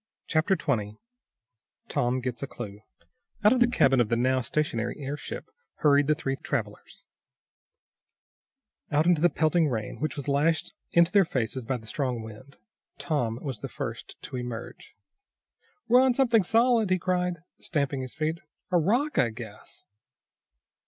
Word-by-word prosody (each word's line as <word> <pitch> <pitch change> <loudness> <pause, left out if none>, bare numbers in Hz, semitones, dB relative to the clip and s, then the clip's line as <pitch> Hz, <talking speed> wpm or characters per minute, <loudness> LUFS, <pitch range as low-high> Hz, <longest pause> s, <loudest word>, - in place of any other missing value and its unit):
Chapter 165 +5 +2
20 105 - -2 0.9
Tom 125 +1 0
Gets 120 -1 -4
A 140 - -3
Clue 105 -6 -8 0.6
Out 210 +3 +7
of 255 - +1
the 245 - +5
cabin 135 - +4
of 110 - 0
the 115 - +2
now 130 +2 +2
stationary 120 -4 -1
airship 145 +1 -6 0.2
hurried 145 -1 +4
the 155 - +3
three 135 -4 -3
travelers; 110 -7 -5 1.9
out 150 +2 +3
into 175 -3 +3
the 175 - +5
pelting 160 0 +2
rain, 115 -6 -3
which 155 -2 -2
was 145 - -5
lashed 150 +3 +1 0.2
into 170 +1 +4
their 200 -1 +6
faces 130 - -2
by 130 +1 -1
the 110 - -14
strong 125 -1 -2
wind. 110 +6 -12 0.4
Tom 140 -6 -1
was 130 -6 -4
the - - -6
first - - -6
to 130 - -5
emerge. 120 -2 -7 0.9
"We're 245 +2 +6
on 260 -2 +3
something 240 -5 +4
solid!" 225 +2 +3
he 185 - +3
cried, 180 -2 -1 0.2
stamping 140 -3 -1
his 130 -1 -7
feet. 160 +1 -1 0.3
"A 175 - +4
rock, 240 - +1
I 120 - +4
guess." 110 -2 -11
140 Hz, 150 wpm, -27 LUFS, 120-175 Hz, 1.9 s, Out